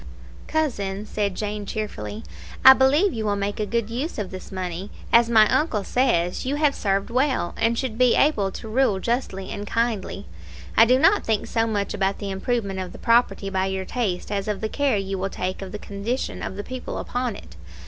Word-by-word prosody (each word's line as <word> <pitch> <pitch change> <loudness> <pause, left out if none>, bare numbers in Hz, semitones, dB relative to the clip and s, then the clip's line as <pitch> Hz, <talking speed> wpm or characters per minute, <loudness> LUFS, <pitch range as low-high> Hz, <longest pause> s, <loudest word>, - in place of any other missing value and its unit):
"Cousin," 210 -11 -1
said 205 -3 -2
Jane 210 0 -3
cheerfully, 215 +1 -5 0.4
"I 265 - +13
believe 285 +9 +3
you 225 - -3
will 205 -1 +1
make 200 +1 -3
a 210 - -1
good 230 0 -1
use 270 +9 -3
of 205 -4 -4
this 185 -1 -9
money. 185 0 -4 0.2
As 235 0 +6
my 220 -2 +6
uncle 235 -9 +1
says, 180 -8 +1
you 270 +3 -1
have 295 -1 +2
served 200 -1 -1
well, 255 -7 +1
and 230 +1 +1
should 240 -3 -3
be 250 -1 +5
able 225 -10 +3
to - - -7
rule 220 -3 +2
justly 195 -5 -2
and 205 0 -5
kindly. 230 -4 -1 0.5
I 225 - +8
do 250 +2 +4
not 390 +9 +4
think 220 -2 0
so 225 -1 0
much 205 -3 -1
about 195 +1 0
the 200 -2 -4
improvement 195 -1 -2
of 185 -1 -5
the - - -9
property 230 -4 +2
by 190 0 0
your 190 0 -3
taste 205 -6 -2
as 200 -1 -2
of 210 -2 -1
the 220 - -2
care 280 -4 +1
you 195 -1 -3
will 195 +1 -1
take 185 0 -4
of 190 -1 -6
the 210 - -5
condition 210 +6 -4
of - - -5
the 205 - -5
people 255 +2 -6
upon 245 -3 -2
it. 80 0 -12
215 Hz, 210 wpm, -24 LUFS, 195-245 Hz, 0.5 s, I